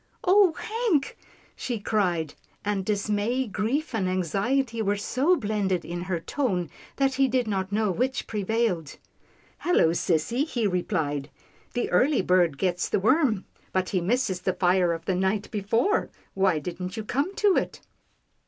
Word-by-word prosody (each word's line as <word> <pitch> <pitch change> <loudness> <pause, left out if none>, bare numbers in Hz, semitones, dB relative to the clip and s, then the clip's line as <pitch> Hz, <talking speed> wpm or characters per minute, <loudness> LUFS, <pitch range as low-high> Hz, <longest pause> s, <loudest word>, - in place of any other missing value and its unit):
"Oh, 380 -2 +5
Hank!" 435 - -1 0.4
she 240 -3 -3
cried, 180 -7 0 0.3
and 205 -2 0
dismay, 210 +5 0
grief 240 +9 -2
and 195 -5 0
anxiety 225 - 0
were 205 -1 +1
so 270 - +2
blended 205 - -1
in 175 +1 -4
her 180 -1 -2
tone, 180 - -2 0.2
that 275 -1 +2
he 270 +1 +3
did 250 -2 0
not 190 -2 -2
know 210 -1 +1
which 255 +7 -1
prevailed. 210 -7 -1 0.3
" - - -33
Hello, 350 - +3
sissy," 170 - +1
he 245 -8 -2
replied, 160 -7 -1 0.2
" - - -32
the 245 - 0
early 255 +5 +3
bird 175 -5 +3
gets 180 0 0
the - - +1
worm 230 - +2
— - - -34
but 185 -1 0
he 185 - 0
misses 200 -1 0
the 185 0 0
fire 180 -1 +2
of 165 0 -4
the 190 - +1
night 190 +3 0
before. 225 - +1 0.2
Why 190 -4 +2
didn't 180 +6 -5
you 220 - -3
come 280 - -1
to 410 -3 +3
it - - -2
205 Hz, 160 wpm, -26 LUFS, 180-255 Hz, 0.4 s, Oh